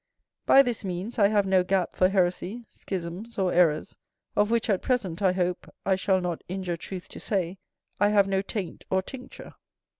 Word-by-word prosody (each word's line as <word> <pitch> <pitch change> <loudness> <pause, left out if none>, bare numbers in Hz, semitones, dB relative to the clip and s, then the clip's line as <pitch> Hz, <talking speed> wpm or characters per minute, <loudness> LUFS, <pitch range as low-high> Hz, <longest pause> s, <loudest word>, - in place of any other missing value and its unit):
By 275 - +8
this 245 -4 -3
means 190 +5 -4
I 200 - +6
have 205 -1 +2
no 190 -1 +3
gap 185 0 0
for 185 - +3
heresy, 190 +4 0
schisms, 190 +5 -6
or 190 -2 +1
errors, 160 -4 +2 0.4
of 205 0 +3
which 235 0 +1
at 200 -4 +1
present, 205 -10 -1
I 190 -2 +4
hope 180 -1 -2
I 195 - +3
shall 190 0 +2
not 175 -2 -3
injure 185 -1 -3
truth 180 +2 -7
to - - -9
say, 190 -2 -2 0.4
I 205 +1 +4
have 200 -2 +4
no 195 0 +1
taint 195 -3 -5
or 190 0 +1
tincture. 260 +4 -10
190 Hz, 185 wpm, -27 LUFS, 180-205 Hz, 0.4 s, By